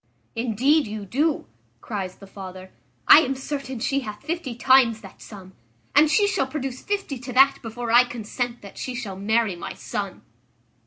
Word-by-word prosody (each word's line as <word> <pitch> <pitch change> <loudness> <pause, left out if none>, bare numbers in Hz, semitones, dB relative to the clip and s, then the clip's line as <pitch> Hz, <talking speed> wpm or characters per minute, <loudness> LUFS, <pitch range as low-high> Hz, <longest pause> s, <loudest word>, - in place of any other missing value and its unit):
"Indeed 245 +6 +2
you 210 -1 -6
do," 290 - 0 0.3
cries 190 - -5
the 195 - -14
father; 185 -1 -10 0.4
"I - - +10
am 270 -4 0
certain 265 -1 -5
she 270 +4 0
hath 210 -4 -8
fifty 310 -5 -4
times 245 -3 +4
that 195 - -14
sum, 190 -3 -12 0.4
and 305 +1 +6
she 410 +5 +4
shall 335 -9 0
produce 265 -2 -5
fifty 395 -10 -3
to 250 +1 -7
that 275 +2 +5
before 230 0 -5
I 240 +2 +7
consent 240 +1 -4
that 200 - -11
she 255 - -4
shall 215 -6 -5
marry 215 0 +1
my 170 - -6
son." - - -5
245 Hz, 170 wpm, -24 LUFS, 210-270 Hz, 0.4 s, I